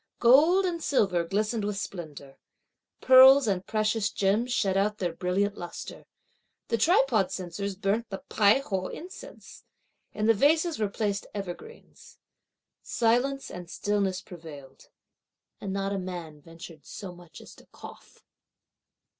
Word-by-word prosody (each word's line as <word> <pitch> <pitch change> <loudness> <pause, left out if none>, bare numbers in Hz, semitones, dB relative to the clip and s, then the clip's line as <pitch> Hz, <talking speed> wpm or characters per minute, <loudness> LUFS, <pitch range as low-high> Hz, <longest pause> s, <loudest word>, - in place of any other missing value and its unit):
Gold 310 +11 +5
and 340 -2 -2
silver 190 -10 +1
glistened 210 +5 -1
with 205 -1 -3
splendour. 155 -9 -8 0.6
Pearls 260 +1 +8
and 190 -2 -1
precious 215 0 0
gems 210 +6 0
shed 195 -5 +1
out 205 +2 +1
their 175 -4 -2
brilliant 190 +4 -1
lustre. 175 -1 -8 0.6
The 230 - 0
tripod 260 - +3
censers 190 +2 -5
burnt 205 +4 -1
the 195 - -5
Pai 215 +5 +3
ho 190 -8 -3
incense. 395 +9 -11 0.5
In 215 - -3
the 225 - +5
vases 310 - +2
were 210 -2 0
placed 200 -1 -3
evergreens. 200 - -9 0.6
Silence 245 +4 0
and 180 -1 -9
stillness 195 -2 -1
prevailed, 145 -6 -12 0.7
and 195 - -5
not 195 0 -2
a 195 - -2
man 175 -5 -7
ventured 165 -1 -13
so 190 -3 -9
much 175 -2 -14
as - - -13
to - - -19
cough. - - -14
200 Hz, 135 wpm, -27 LUFS, 180-235 Hz, 0.7 s, Pearls